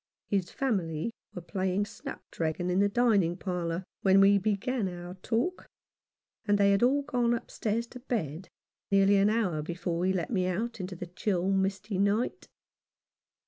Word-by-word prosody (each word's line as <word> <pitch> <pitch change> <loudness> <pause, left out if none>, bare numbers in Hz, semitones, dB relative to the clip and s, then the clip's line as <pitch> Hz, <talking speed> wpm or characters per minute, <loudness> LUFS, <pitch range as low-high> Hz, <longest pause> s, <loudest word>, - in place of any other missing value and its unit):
His 195 -3 -1
family 190 - -1 0.2
were 180 - -6
playing 185 +3 -1
snapdragon 180 - -4
in 180 - +2
the 200 0 +4
dining 200 -7 +2
parlour 180 -2 -2 0.2
when 195 0 +5
we 200 +1 +6
began 215 +3 0
our 175 0 -7
talk, 230 - -2 0.8
and 205 -1 +2
they 200 0 +4
had 200 - +3
all 275 +4 +3
gone 240 -3 +1
upstairs 230 0 -2
to 250 - -10
bed 190 - -3 0.4
nearly 195 0 +5
an 200 +1 +4
hour 200 -9 0
before 170 +2 -3
he 185 - +3
let 185 +1 -2
me 185 -5 +1
out 225 +6 -2
into 185 0 -5
the 175 - -6
chill 180 +1 -1
misty 195 +1 0
night. 205 +4 0
195 Hz, 155 wpm, -29 LUFS, 180-225 Hz, 0.8 s, we